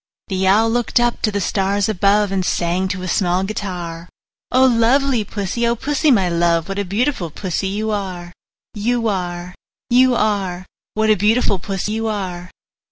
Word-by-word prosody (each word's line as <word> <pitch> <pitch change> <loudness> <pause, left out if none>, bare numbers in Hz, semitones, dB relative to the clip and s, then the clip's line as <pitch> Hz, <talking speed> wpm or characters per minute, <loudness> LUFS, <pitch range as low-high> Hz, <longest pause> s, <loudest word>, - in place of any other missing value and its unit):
The 190 -1 0
Owl 220 +4 +4
looked 240 +1 +1
up 240 0 0
to 215 - +1
the 200 - -1
stars 200 +1 0
above, 205 0 +2
And 190 -1 0
sang 175 +1 0
to 185 0 -4
a - - -4
small 180 0 +1
guitar, 180 -4 -5 0.4
"O 260 +1 +5
lovely 250 +1 +3
Pussy, 205 +3 -2
O 235 - +1
Pussy, 290 +5 0
my 200 -9 +4
love, 170 -1 +1
What 195 +1 -3
a 200 - -1
beautiful 205 - -1
Pussy 185 +3 -3
you 215 +3 -2
are, 180 -4 -4 0.4
You 230 +2 0
are, 180 -3 -3 0.4
You 255 +1 +5
are! 195 -5 -1 0.3
What 220 0 +2
a - - +5
beautiful 210 0 +2
Pussy 195 +2 -3
you 225 +1 -2
are!" 185 -4 -4
200 Hz, 170 wpm, -19 LUFS, 180-225 Hz, 0.4 s, O